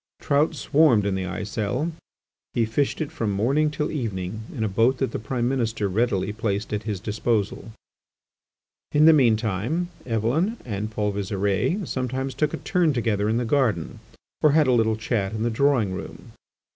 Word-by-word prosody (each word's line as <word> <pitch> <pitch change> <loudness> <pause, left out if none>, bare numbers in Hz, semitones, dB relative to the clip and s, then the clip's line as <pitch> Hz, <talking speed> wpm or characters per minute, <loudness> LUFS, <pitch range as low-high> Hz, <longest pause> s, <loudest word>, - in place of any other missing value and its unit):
Trout 150 +2 +1
swarmed 140 -6 +3
in 100 - 0
the 95 -1 -2
Aiselle; 110 - -2 0.6
he 115 - +3
fished 135 +8 -1
it 150 - -3
from 115 - -2
morning 135 +10 +2
till 150 0 -2
evening 110 - -3
in 110 - -3
a - - +1
boat 115 +6 +2
that 135 - -1
the - - -3
Prime 120 +2 -2
Minister 115 -5 0
readily 100 -1 0
placed 105 -1 -2
at 105 +1 -3
is 105 -4 -2
disposal. 110 +1 -2 1.2
In 150 +1 +5
the 160 - +9
mean 120 -7 +4
time, 115 - -2 0.2
Eveline 130 - 0
and 105 -2 -3
Paul 105 -1 -1
Visire 100 - -1
sometimes 130 +1 -2
took 150 -1 0
a - - -3
turn 175 -5 +1
together 110 -4 0
in 110 - +1
the 120 - 0
garden, 115 - 0 0.4
or 150 -2 +5
had 155 -1 +5
a 130 - +3
little 110 -2 +3
chat 110 -2 -2
in 110 0 -2
the 120 - 0
drawing 120 -5 +2
room. 95 - -8
115 Hz, 175 wpm, -24 LUFS, 105-140 Hz, 1.2 s, the